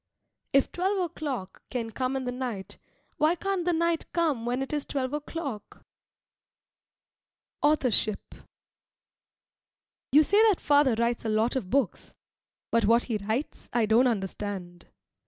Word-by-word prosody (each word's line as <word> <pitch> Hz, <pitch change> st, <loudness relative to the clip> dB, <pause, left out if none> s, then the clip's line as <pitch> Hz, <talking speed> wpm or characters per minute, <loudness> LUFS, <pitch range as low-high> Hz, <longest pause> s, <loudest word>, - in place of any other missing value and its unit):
If 275 Hz, -, +3 dB
twelve 380 Hz, +3 st, 0 dB
o'clock 295 Hz, -, -4 dB
can 230 Hz, -3 st, -3 dB
come 255 Hz, +3 st, -2 dB
in 265 Hz, -, -2 dB
the 250 Hz, -, -2 dB
night, 245 Hz, -6 st, -5 dB, 0.4 s
why 310 Hz, +3 st, +3 dB
can't 385 Hz, -1 st, -2 dB
the 355 Hz, -, +3 dB
night 335 Hz, 0 st, 0 dB
come 300 Hz, -9 st, 0 dB
when 250 Hz, +2 st, 0 dB
it 270 Hz, -, -7 dB
is 295 Hz, -1 st, -1 dB
twelve 265 Hz, -1 st, -3 dB
o'clock? 295 Hz, -7 st, -6 dB, 1.8 s
AUTHORSHIP 255 Hz, -8 st, +1 dB, 1.8 s
You 300 Hz, +3 st, +7 dB
say 405 Hz, +7 st, +4 dB
that 395 Hz, -, +1 dB
father 285 Hz, -4 st, +4 dB
writes 235 Hz, +1 st, 0 dB
a 225 Hz, -, -2 dB
lot 220 Hz, +3 st, +1 dB
of 225 Hz, -9 st, -2 dB
books, 260 Hz, -6 st, -1 dB, 0.6 s
but 230 Hz, -2 st, +3 dB
what 230 Hz, +3 st, +4 dB
he 225 Hz, -4 st, -2 dB
writes 220 Hz, +8 st, -4 dB
I 235 Hz, -2 st, +3 dB
don't 225 Hz, +4 st, +4 dB
understand. 190 Hz, -4 st, -4 dB
255 Hz, 135 wpm, -27 LUFS, 225-300 Hz, 1.8 s, You